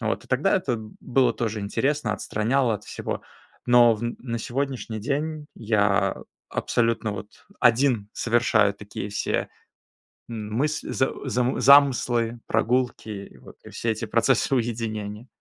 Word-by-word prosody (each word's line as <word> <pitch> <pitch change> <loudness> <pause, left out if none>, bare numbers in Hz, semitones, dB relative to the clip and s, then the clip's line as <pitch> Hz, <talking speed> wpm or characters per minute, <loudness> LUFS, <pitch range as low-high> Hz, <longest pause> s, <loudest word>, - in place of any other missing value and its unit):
Вот, 110 -1 -2
и - - -20
тогда 145 +10 +2
это 135 -10 -1 0.2
было 130 +1 +2
тоже 110 -2 -2
интересно, 130 +4 0
отстраняло 115 +5 0
от 105 0 -7
всего. - - -5 0.4
Но 120 -1 +6
в 105 - -8 0.2
на 115 -2 -4
сегодняшний 125 -2 -3
день 150 +5 -2
я 100 -3 +1 0.3
абсолютно 115 -2 0
вот 105 +1 -10 0.2
один 120 -3 +3
совершаю 115 -3 +2
такие 105 0 -7
все, 105 - -1 0.8
м, 110 -2 -5
мысл 150 +5 -1
за 130 - +1 0.2
за 125 +1 0
замыслы, 125 -4 +5
прогулки, 125 -1 0
и 100 -2 -8
вот, - - -15
и - - -10
все 115 - -2
эти 110 +1 -3
процессы 120 +5 +2
уединения. 110 -2 -3
115 Hz, 135 wpm, -25 LUFS, 105-130 Hz, 0.8 s, Но